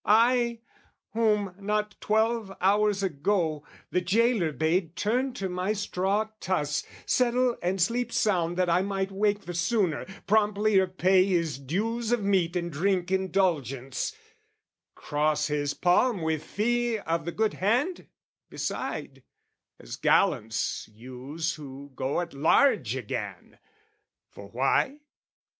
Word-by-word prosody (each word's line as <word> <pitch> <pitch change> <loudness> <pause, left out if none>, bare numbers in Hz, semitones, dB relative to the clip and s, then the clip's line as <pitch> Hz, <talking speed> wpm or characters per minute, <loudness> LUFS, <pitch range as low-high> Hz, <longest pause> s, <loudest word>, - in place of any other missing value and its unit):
I 235 +1 +3 0.5
Whom, 210 -4 +1
not 210 +1 -1
twelve 220 -1 +1
hours 205 +1 +2
ago, 160 -2 0 0.3
the 180 - +1
gaoler 205 -1 +2
bade 160 +3 0
Turn 250 +6 0
to 195 -6 -3
my 180 +3 -1
straw 205 +1 -1
truss, 150 -6 -1 0.2
settle 250 0 +2
and 185 +2 -1
sleep 240 +6 +1
sound 175 -6 +1
That 185 -1 +2
I 175 +1 +3
might 195 0 -2
wake 205 +1 +1
the 175 -1 -7
sooner, 175 -2 0 0.2
promptlier 210 -2 +3
pay 185 0 +3
His 170 -7 0
dues 220 - -2
of 240 -3 +1
meat 185 -4 +1
and 170 -1 -2
drink 180 +3 0
indulgence, 170 - 0 0.8
cross 150 0 0
His 145 -1 -1
palm 180 +2 +2
with 160 -1 -1
fee 240 +2 0
of 165 -5 -2
the 170 - -2
good 220 +2 0
hand, 250 - 0 0.4
beside, - - -4 0.6
As - - -8
gallants 115 - +1
use 130 +8 -5
who 140 -2 -10
go 135 +7 -1
at 170 -3 -6
large 160 - +3
again! - - -6 0.7
For - - -11
why? 275 +2 +1
190 Hz, 125 wpm, -27 LUFS, 165-215 Hz, 0.8 s, I